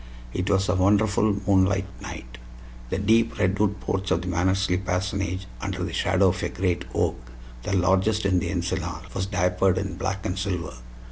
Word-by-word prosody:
It 90 +2 -2
was 95 -1 +2
a 90 - +2
wonderful 100 +2 +2
moonlight 95 -1 +3 0.2
night. - - -8 0.5
The - - -1
deep 110 +4 +2
redwood 100 +2 +1
porch 95 0 -2
of 85 - +1
the - - -6
Mannersley 95 +1 +1
parsonage, 95 0 -2 0.2
under 95 -3 -3
the 90 -2 -4
shadow 95 +1 +3
of 90 0 -2
a - - -1
great 90 -1 -1
oak - - +1 0.4
the 100 - -3
largest 95 +4 +2
in 95 -2 +3
the - - -3
Encinal - - -2
was 95 0 -2
diapered 90 -1 +2
in 95 -2 -3
black 95 +1 -3
and 95 +1 -2
silver. 90 -7 -3
95 Hz, 175 wpm, -25 LUFS, 90-100 Hz, 0.5 s, moonlight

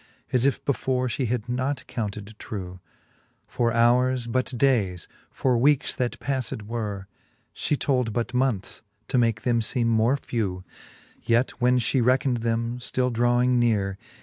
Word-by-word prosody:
As 125 +1 +3
if 140 - -1
before 130 -2 0
fhe 125 +1 -1
had 120 0 -2
not 130 +3 -2
counted 105 -2 -5
trew. 90 -3 -6 0.7
For 120 -2 0
houres 125 +2 +3
but 130 +2 0
dayes; 105 -10 +1 0.2
for 125 -3 +1
weekes, 145 +2 +3
that 125 -1 -2
pafled 130 -6 -3
were, 105 -3 -4 0.5
She 150 - -1
told 125 -5 0
but 120 +3 -2
moneths, 125 -6 -1 0.3
to 130 - +2
make 115 -2 +1
them 120 -2 +2
feeme 120 +2 0
more 115 +4 +3
few: 100 -9 -3 0.6
Yet 120 +2 +2
when 125 +1 +4
fhe 125 +1 +1
reckned 130 0 +2
them, 115 +1 -1
ftill 125 0 -1
dravving 120 +1 +3
neare. 100 -5 +1
120 Hz, 150 wpm, -25 LUFS, 110-130 Hz, 0.7 s, when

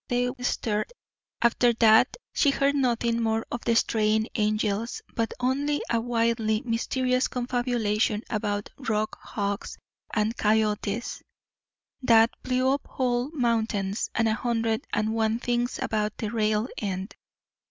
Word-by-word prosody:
They 245 0 +1
stared. 220 - -1 0.5
After 235 0 +4
that 220 -1 +5 0.2
she 290 - +3
heard 275 0 +2
nothing 235 -4 +1
more 225 0 0
of 240 - -3
the 235 - +3
Straying 220 0 +2
Angels, 215 0 -1
but 230 -1 -1
only 280 +4 0
a 230 -1 +2
wildly 230 -2 0
mysterious 255 +2 0
confabulation 240 -4 0
about 205 -2 -2
"rock 215 -4 -1
hogs," 200 -1 -4 0.3
and 220 +1 0
"coyotes" 215 +1 0 0.8
that 230 -2 +5
blew 255 +1 +1
up 280 - -4
whole 245 0 -1
mountains, 225 -7 0
and 225 - +2
a 220 - +2
hundred 225 -1 -1
and 215 +1 0
one 220 0 +1
things 245 0 -1
about 210 -1 -1
the 215 -2 -3
"rail 215 0 +1
end." 190 -1 -4
230 Hz, 130 wpm, -26 LUFS, 215-245 Hz, 0.8 s, that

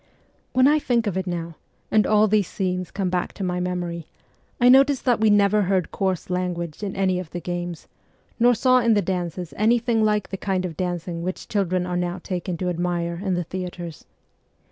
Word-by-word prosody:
When 255 +1 +5
I 300 +1 +4
think 240 -5 +1
of 200 -4 -1
it 190 0 -2
now, 170 -2 -4 0.3
and 215 -3 +4
all 215 0 +4
these 205 -3 +2
scenes 185 -2 -2
come 190 -3 -2
back 180 -1 -1
to 200 - -6
my 180 -1 -1
memory, 175 -2 -3 0.5
I 245 - +5
notice 270 +2 +6
that 245 -4 +2
we 220 0 +4
never 205 0 +4
heard 190 -2 0
coarse 190 -2 -2
language 175 -3 -3
in 200 -2 -4
any 185 -2 +1
of 180 -3 -7
the 175 - -5
games, 175 -1 -5 0.5
nor 245 +1 +5
saw 255 +2 +4
in 230 -2 +3
the 205 - +2
dances 180 -1 -3
anything 230 +1 +2
like 210 -1 +1
the 195 - -4
kind 190 -1 -1
of 170 -3 -5
dancing 175 -1 -3
which 185 +2 -5
children 185 -3 0
are 180 0 -2
now 175 0 -2
taken 180 -1 -4
to 180 +1 -2
admire 175 0 -2
in 190 -3 0
the 175 - -1
theatres. 175 -2 -7
185 Hz, 200 wpm, -23 LUFS, 175-210 Hz, 0.5 s, notice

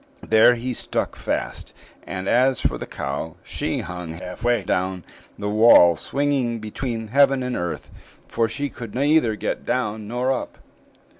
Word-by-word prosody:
There 110 +2 +5
he 125 +2 -3
stuck - - -3
fast; - - -4 0.3
and 95 0 -4
as 130 +1 +3
for - - 0
the - - -6
cow, 75 +4 -4
she - - -3
hung 90 -2 -6
half 90 +4 -8
way 120 -3 +2
down 95 -1 -1 0.3
the 105 - -4
wall, 105 -5 +7
swinging 135 - -1
between 115 +1 -5
heaven 135 +1 +4
and 125 0 -2
earth, 85 -1 -4 0.4
for 115 -1 0
she 140 +6 -3
could 115 -5 -9
neither 140 -4 +3
get - - -3
down 110 -4 -2
nor 125 +3 0
up. 130 - -3
115 Hz, 155 wpm, -23 LUFS, 95-125 Hz, 0.4 s, wall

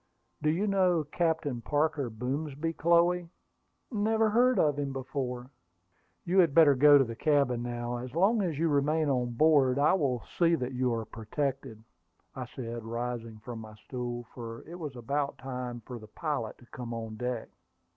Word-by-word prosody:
"Do 150 - +2
you 175 +7 +1
know 185 -5 +2
Captain 160 -5 -1
Parker 145 -1 0
Boomsby, 140 +7 -3
Chloe?" 170 +1 +3 0.6
"Never 220 0 +2
heard 250 +3 +4
of 145 -2 +2
him 140 -1 -2
before." 130 -1 -4 0.7
"You 185 +3 +3
had 165 -6 +4
better 155 -4 +7
go 145 +2 +7
to 135 - +5
the 115 -2 -6
cabin 140 -4 +2
now. 120 0 -3
As 125 +3 -7
long 205 +6 +3
as 170 -7 -1
you 165 +2 +2
remain 150 +1 +2
on 125 -3 0
board, 140 -1 +4
I 145 +4 +4
will 135 -10 0 0.2
see 170 -1 +5
that 130 -4 -3
you 125 0 +1
are 115 -1 -2
protected," 125 0 -4 0.5
I - - -5
said, 120 -2 -6
rising 115 -1 -4
from 120 -2 -6
my 110 -1 -10
stool, 120 +1 -5
for 115 -1 -7
it 175 +2 -9
was 150 -5 -6
about 140 +4 -2
time 125 -2 -5
for 125 -2 -7
the 110 - -12
pilot 140 -2 -3
to 120 - -18
come 120 -1 -7
on 110 -1 -6
deck. 125 -1 -3
135 Hz, 175 wpm, -30 LUFS, 120-160 Hz, 0.7 s, better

